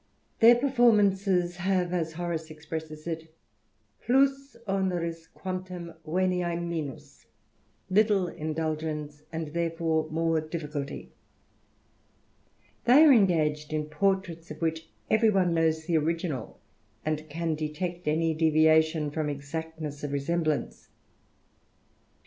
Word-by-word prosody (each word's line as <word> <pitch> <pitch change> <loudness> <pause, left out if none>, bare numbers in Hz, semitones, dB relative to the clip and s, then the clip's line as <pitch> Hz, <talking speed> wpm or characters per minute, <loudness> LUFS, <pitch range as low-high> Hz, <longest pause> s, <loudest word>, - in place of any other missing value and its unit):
Their 235 +2 +8
pe^ 265 +2 -1
formances 195 -7 +3
have, 180 -1 0
as 165 -3 -1
Horace 165 -1 -3
expresses 155 0 -7
it, 160 -1 -6 0.7
plus 275 +2 +2
onerii 175 -4 -1
guantunt 185 -3 -6
venia 175 +1 0
minus, 150 -6 -6 0.6
littie 200 -3 +3
indulgence, 155 -1 -3
and 160 -2 -4
therefore 165 -2 0
more 165 0 +1
difficult.. 150 -3 -4
They - - -8 2.0
are 295 - +8
engaged 155 - +2
in 150 0 -2
portraits 175 0 -1
of 150 0 -8
which 160 0 -2 0.2
every 220 0 +5
one 185 -4 +2
knows 160 -1 +1
the 170 -1 +2
original, 165 -3 -3 0.5
and 155 0 -2
can 165 +2 -2
detect 160 +3 -4
any 160 +1 +2
deviation 160 -1 +3
from 155 0 -2
exactness 150 +1 -6
of 145 -1 -3
resemblance. 155 +2 -1
165 Hz, 110 wpm, -28 LUFS, 155-180 Hz, 2.0 s, Their